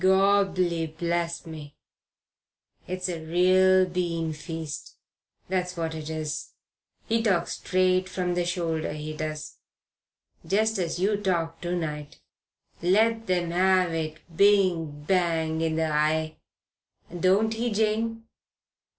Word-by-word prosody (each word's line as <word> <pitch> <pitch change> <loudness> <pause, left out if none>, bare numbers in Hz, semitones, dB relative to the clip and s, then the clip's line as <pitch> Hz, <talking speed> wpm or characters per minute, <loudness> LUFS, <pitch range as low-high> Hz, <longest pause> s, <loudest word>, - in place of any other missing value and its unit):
Gorbli 190 -3 +3
bless 170 0 -1
me, 155 -3 -9 1.1
it's 185 0 -3
a 170 -3 -4
real 185 +3 +4
bean 170 -3 -2
feast 160 -1 -7 0.5
that's 180 -1 -2
what 165 -1 -2
it 155 -1 -6
is. 155 -1 -4 0.5
He 230 0 +1
talks 190 -6 +1
straight 185 0 +1
from 180 -1 -1
the 175 0 0
shoulder, 165 -3 -2
he 155 0 -6
does, 155 0 -5 0.9
just 215 +2 +1
as 170 -2 -1
you 200 +3 +1
talked 170 -5 -1
to 175 0 -2
night. 150 -3 -5 0.6
Lets 225 +5 +2
'em 175 -2 0
'ave 180 -3 +2
it 155 0 -10
bing 180 -7 +3
bang 165 -2 +1
in 160 -1 0
the 160 -1 0
eye. 155 +1 +1 0.8
Don't 200 +5 +3
he, 235 +2 -1
Jane?" 220 +2 0
175 Hz, 120 wpm, -26 LUFS, 160-190 Hz, 1.1 s, real